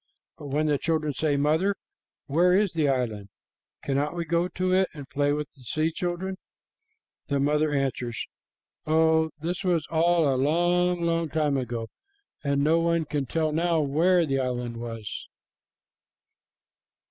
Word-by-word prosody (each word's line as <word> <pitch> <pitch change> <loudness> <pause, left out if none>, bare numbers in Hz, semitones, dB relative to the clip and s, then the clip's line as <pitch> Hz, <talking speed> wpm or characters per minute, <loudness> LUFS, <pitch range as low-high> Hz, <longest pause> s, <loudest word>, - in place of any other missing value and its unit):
But 145 - -8
when 150 +3 0
the 145 -2 +1
children 155 -3 0
say, 145 +1 0
"Mother, 160 +8 +2 0.5
where 175 +5 +3
is 200 -1 +2
the 155 -4 +1
island? 110 -7 -1 0.5
Cannot 140 +4 -1
we 170 -1 -2
go 170 +2 +1
to 185 0 -1
it 190 0 +3
and 145 -3 -8
play 145 0 0
with 150 0 -2
the 135 - -21
sea 155 +6 -1
children?" 180 +3 -3 0.9
the 140 -1 0
mother 150 +2 +2
answers, 130 -4 -2 0.6
"Oh, 160 0 +3
this 175 +4 -3
was 175 -4 +1
all 165 0 +3
a 130 -2 +1
long, 175 +4 +2
long 165 -1 0
time 150 -2 +1
ago, 120 -3 -3 0.6
and 140 -1 +1
no 160 +3 +4
one 170 -1 +1
can 145 -2 -2
tell 155 +3 0
now 165 +1 +1
where 165 +5 +3
the 135 -2 0
island 125 -2 -2
was." 115 -3 -6
155 Hz, 150 wpm, -26 LUFS, 140-170 Hz, 0.9 s, no